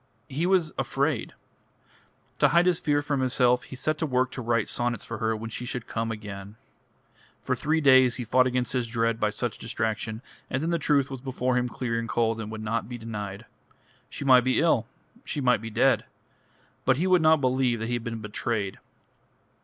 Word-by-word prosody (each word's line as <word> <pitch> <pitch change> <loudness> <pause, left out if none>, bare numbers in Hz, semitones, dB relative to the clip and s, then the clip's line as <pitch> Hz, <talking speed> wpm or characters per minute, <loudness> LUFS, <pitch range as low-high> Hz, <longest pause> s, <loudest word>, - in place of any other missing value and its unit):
He 150 +6 -1
was 180 -5 +2
afraid. 135 0 -1 1.0
To - - +6
hide 170 +1 +4
his 180 -2 +2
fear 145 -1 +1
from 145 -2 -1
himself, 125 -1 +3
he 130 - -9
set 155 +4 -1
to 160 - 0
work 130 -1 +1
to 130 - -6
write 115 -2 0
sonnets 120 -3 -2
for 115 - -6
her 110 0 0
when 115 +1 -6
she 125 - -4
should 125 -1 -4
come 115 0 -3
again.... 105 -2 -8 0.9
For 130 - 0
three 155 +5 0
days 130 -3 +6
he 125 - -4
fought 130 +3 +3
against 125 0 -1
his 125 -2 0
dread 115 -1 0
by 105 - +2
such 110 +2 -4
distraction, 110 0 -3 0.3
and 130 +3 -1
then 165 - 0
the 170 - +1
truth 140 -3 +2
was 135 -2 -6
before 130 -1 -1
him 125 0 +1
clear 115 -2 -2
and 115 -1 -5
cold, 115 -1 0
and 105 - -6
would 110 -1 -6
not 115 +1 -2
be 120 - -5
denied. 105 -2 -6 0.6
She 140 - -6
might 130 -2 +7
be 130 0 +2
ill, 145 -9 +2 0.4
she 150 - -4
might 125 -5 +3
be 115 - -6
dead; 130 +3 +2 0.8
but 130 -1 +3
he 170 - 0
would 185 -2 +4
not 160 0 +5
believe 130 -2 +1
that 110 - -3
he 120 - -2
had 120 -1 -2
been 115 -1 -5
betrayed. 105 -1 -3
125 Hz, 205 wpm, -26 LUFS, 115-135 Hz, 1.0 s, might